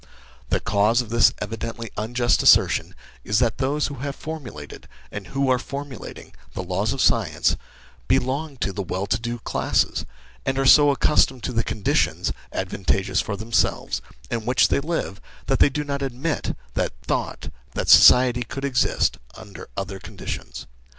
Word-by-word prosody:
The - - +1
cause 105 +4 +2
of 115 -3 -9
this 115 0 +5
evidently 115 +1 -6
unjust 120 +3 +1
assertion - - +4 0.3
is 105 - 0
that 120 -1 +1
those 140 +3 0
who 145 - -4
have 140 +1 -4
formulated, 135 - -8 0.2
and 100 -3 -7
who 135 +4 -1
are 130 -1 +3
formulating, 140 -3 -8 0.2
the - - -4
laws 95 +5 -1
of 135 - -4
science, - - +2 0.5
belong 140 +3 0
to 100 - -1
the 100 - -3
well 95 +1 -3
to 100 - 0
do 120 +1 -4
classes, 115 - 0 0.4
and 135 - -1
are 135 - +1
so 145 +2 +7
accustomed 135 -3 +2
to 125 - -3
the 115 -1 +1
conditions, 105 -3 0 0.2
advantageous 95 -1 -1
for 100 -2 -4
themselves, 110 - 0 0.3
in 115 -2 -2
which 125 +1 +3
they - - +2
live, 150 - -3 0.2
that - - 0
they - - +6
do 150 +2 -3
not 140 -1 -3
admit 135 +4 -3 0.2
the - - -1
thought - - -3 0.2
that - - -2
society 125 -1 +7
could 135 +4 -5
exist 130 -3 +1 0.2
under 100 -5 -11
other 95 0 -4
conditions. - - -7
120 Hz, 160 wpm, -23 LUFS, 105-135 Hz, 0.5 s, so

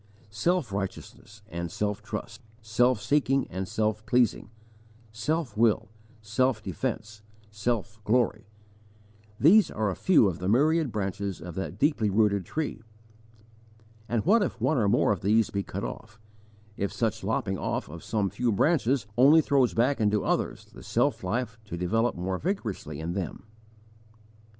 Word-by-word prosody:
Self 145 - 0
righteousness 100 +1 -6
and 85 -4 -5
self 105 +1 -2
trust, - - -6 0.2
self 120 +2 +2
seeking 135 0 +1
and 95 +1 -4
self 110 +2 -1
pleasing, 120 -4 +2 0.6
self 145 +7 -2
will, 110 -2 +2 0.3
self 110 +1 0
defence, 105 +4 -4 0.3
self 105 0 -3
glory 110 -1 +1 0.9
these 195 +9 +6
are 105 -2 -1
a - - -4
few 170 - +4
of 90 -4 -3
the 90 +1 -2
myriad 150 +4 +3
branches 100 -2 -3
of 85 +1 -8
that 95 +3 -5
deeply 140 -8 +2
rooted 100 -2 +2
tree. 155 - -3 1.3
And 115 -2 0
what 215 +6 +5
if 200 - -2
one 155 -4 +1
or 105 -3 +2
more 120 0 +3
of 100 - -1
these 110 +2 +2
be 100 - -1
cut - - -6
off, 105 - -7 0.6
if 100 - -1
such 110 -1 -2
lopping 95 -3 -1
off - - -2
of 80 +2 -10
some 105 -4 -1
few 120 -1 0
branches 130 - +2
only 145 +5 +7
throws 135 -4 +2
back 125 +2 +2
into 105 -1 +2
others - - -1
the - - -15
self - - 0
life 115 +4 -2
to 85 -4 -6
develop 115 +7 0
more 90 +1 -3
vigorously 110 - -3
in 80 +2 -3
them? 90 -3 -4
110 Hz, 150 wpm, -27 LUFS, 100-125 Hz, 1.3 s, only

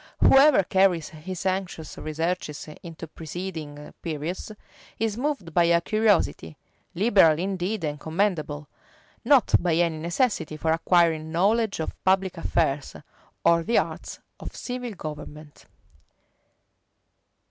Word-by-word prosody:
Whoever 275 -5 +6
carries 185 -3 +2
his 170 +4 -7
anxious 185 -4 -3
researches 155 -1 -3
into 165 -1 -8
preceding 160 -2 -7
periods, 165 +5 -4 0.5
is 220 -1 -1
moved 250 - -3
by 170 +1 +4
a 170 0 +4
curiosity, 205 - +1 0.4
liberal 190 -5 +5
indeed 190 +2 -2
and 150 -1 -3
commendable; 160 -4 -1 0.6
not 275 -4 +4
by 170 -2 +1
any 165 -2 +1
necessity 170 - -1
for 160 +1 0
acquiring 165 -1 +2
knowledge 205 +5 +1
of 160 - -3
public 190 -1 +2
affairs, 150 -4 -1 0.5
or 170 0 +5
the 230 +8 +1
arts - - -2 0.2
of - - -8
civil 250 -2 -5
government. 150 -3 -9
170 Hz, 115 wpm, -25 LUFS, 155-195 Hz, 0.6 s, Whoever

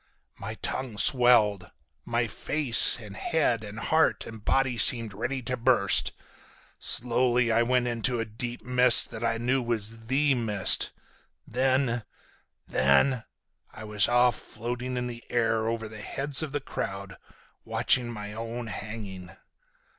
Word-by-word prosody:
My 110 +3 -6
tongue 130 -5 -4
swelled, 105 -5 +4 0.4
my - - -1
face 145 -6 +3
and 105 -4 -10
head 125 -6 -1
and 105 0 -9
heart 160 +8 +1
and 110 -2 -11
body 135 0 +1
seemed 115 -2 +5
ready 120 +5 -4
to 125 +1 -3
burst. 120 -5 +3 0.7
Slowly 120 0 +1
I 115 +1 +3
went 125 +1 +1
into 120 0 0
a 115 - -2
deep 120 +3 -7
mist 125 -1 +4
that 110 0 -7
I 115 0 0
knew 125 +3 0
then 120 - -8
was 115 0 -4
the 140 +3 +2
mist, 110 -6 +2 0.6
then—then—I 120 - -2
was 105 -2 +2
off 120 -1 +3
floating 125 +3 -6
in 125 - -2
the 120 -1 -8
air 115 -2 0
over 115 -1 -3
the 110 0 -11
heads 135 +7 -1
of 155 -3 -4
the 145 0 -3
crowd, 95 -6 -6 0.5
watching 125 -2 +1
my 105 -2 -8
own 115 +2 -6
hanging! 105 -4 -8
115 Hz, 140 wpm, -26 LUFS, 110-125 Hz, 0.7 s, seemed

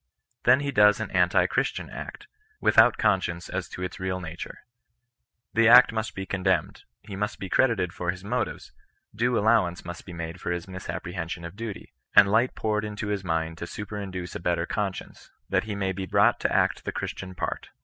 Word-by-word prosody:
*' 120 - -48
Then 130 +3 +6
he 140 -1 -2
does 105 -3 +5
an - - -3
antirchristian - - +1
act, - - -8 0.3
without - - +5
conscience 90 -3 0
as 90 -1 -4
to 90 - -6
its 90 +3 -5
real 95 0 -2
na 85 -3 -6
ture. - - -8 0.9
The 115 0 +4
act 125 +2 +9
must 110 -1 -3
be 95 - -4
condemned; 95 -1 -1 0.2
he 100 - -8
must 105 +1 -2
be 95 - -6
credited 100 -9 +2
for 90 -1 -4
his 90 +1 -3
motives; 120 +4 -3 0.4
due 120 +3 +1
allowance 105 -5 +2
must 85 0 -7
be 90 - -8
made 85 +1 -6
for - - -3
his 85 0 -3
misapprehension 90 -2 -5
of 85 +2 -8
duty; 110 -2 -7 0.2
and 100 -1 +9
light 120 +4 +2
poured 105 -1 -1
into 105 0 -4
his 100 -2 -2
mind 80 -2 -2
to - - -4
superinduce 100 -4 -6
a - - -3
better 85 -1 0
conscience, 100 0 -4 0.2
that - - +1
he 105 -2 -4
maybe 95 -1 -2
brought - - +3
to - - 0
act - - +1
the - - -3
Christian 95 -1 -5
part. - - -4
95 Hz, 190 wpm, -26 LUFS, 90-105 Hz, 0.9 s, act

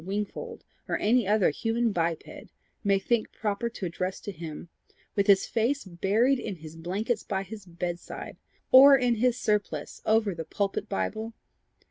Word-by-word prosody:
Wingfold, 210 - -4 0.3
or - - +1
any 230 0 +2
other 210 -5 +3
human 230 +6 0
biped, 165 -3 -1 0.6
may 200 -1 +3
think 220 +3 0
proper 210 +2 -2
to 220 -4 -6
address 180 +2 -3
to 205 - -5
him 165 -2 -8 0.5
with 200 -1 +1
his 195 -2 +5
face 240 +4 0
buried 205 +9 +2
in 205 - -4
his 160 -1 -11
blankets 200 +7 -2
by 195 -1 -2
his 205 0 -10
bedside 175 0 -6 0.3
or 275 +1 +10
in 245 -2 +2
his 245 +2 +2
surplice 205 -10 -2
over 220 -2 +2
the 165 -1 -5
pulpit 195 +5 -2
bible? 215 - -3
205 Hz, 155 wpm, -28 LUFS, 180-230 Hz, 0.6 s, or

